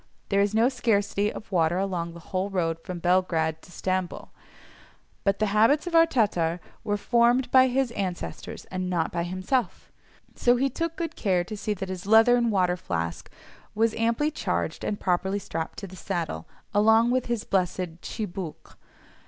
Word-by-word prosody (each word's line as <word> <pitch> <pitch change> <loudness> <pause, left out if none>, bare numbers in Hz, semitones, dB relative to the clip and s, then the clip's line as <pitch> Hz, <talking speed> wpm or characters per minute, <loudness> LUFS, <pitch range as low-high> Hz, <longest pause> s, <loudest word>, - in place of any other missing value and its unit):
There 200 0 +3
is 205 +1 +1
no 225 +2 +5
scarcity 210 -5 +1
of 210 - -10
water 170 -1 +2
along 180 -3 -2
the - - -9
whole 190 +1 0
road 165 -4 -1
from 180 +2 -6
Belgrade 170 -3 +1
to - - -16
Stamboul, 185 -1 -3 0.9
but 195 0 +2
the 215 - +1
habits 230 +10 +4
of 350 - -5
our 330 0 +6
Tatar 180 - +1 0.2
were 205 0 0
formed 240 +4 +2
by 260 0 +7
his 260 -1 0
ancestors 190 -5 -5
and 185 -1 -2
not 170 -3 0
by 170 - -1
himself, 185 +5 -2 0.4
so 245 0 +3
he 270 +2 +1
took 330 +4 -3
good 330 -2 -4
care 185 -4 +1
to 215 - -7
see 210 0 -2
that 195 0 -5
his 185 0 -6
leathern 235 +2 +5
water 180 -4 +2
flask 85 - -4 0.5
was 225 +1 +2
amply 230 +7 +1
charged - - -2
and 205 - -2
properly 190 +2 0
strapped 165 -4 -5
to 200 - -6
the 185 -1 -11
saddle, 160 - -4 0.3
along 220 +3 +5
with 255 0 0
his 235 -3 -1
blessed 180 -3 -1
tchibouque. 190 -6 -6
200 Hz, 170 wpm, -26 LUFS, 180-230 Hz, 0.9 s, by